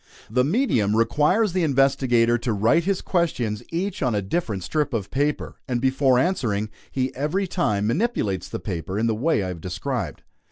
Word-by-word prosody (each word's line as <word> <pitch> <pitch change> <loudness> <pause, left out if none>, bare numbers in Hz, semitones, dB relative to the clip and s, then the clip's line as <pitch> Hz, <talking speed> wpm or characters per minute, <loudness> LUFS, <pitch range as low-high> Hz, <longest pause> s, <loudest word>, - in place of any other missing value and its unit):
The 125 +2 +3
medium 135 - +1
requires 150 - +2
the 185 - +1
investigator 130 -5 +3
to 120 -1 -1
write 115 +12 +2
his 195 -1 0
questions 120 - -1
each 185 +3 -3
on 125 -6 +1
a 100 - +1
different 105 - -2
strip 145 - -1
of 100 -3 -3
paper; 145 +2 -1
and 125 -2 0
before 130 0 +3
answering, 115 - 0 0.2
he 130 -1 -1
every 150 +9 -1
time 105 - 0
manipulates 110 - -1
the - - -4
paper 95 0 -4
in 110 - +1
the 115 - +2
way 125 0 +1
I 95 - -3
have 85 -3 -6
described. 90 0 -4
125 Hz, 175 wpm, -24 LUFS, 105-160 Hz, 0.2 s, The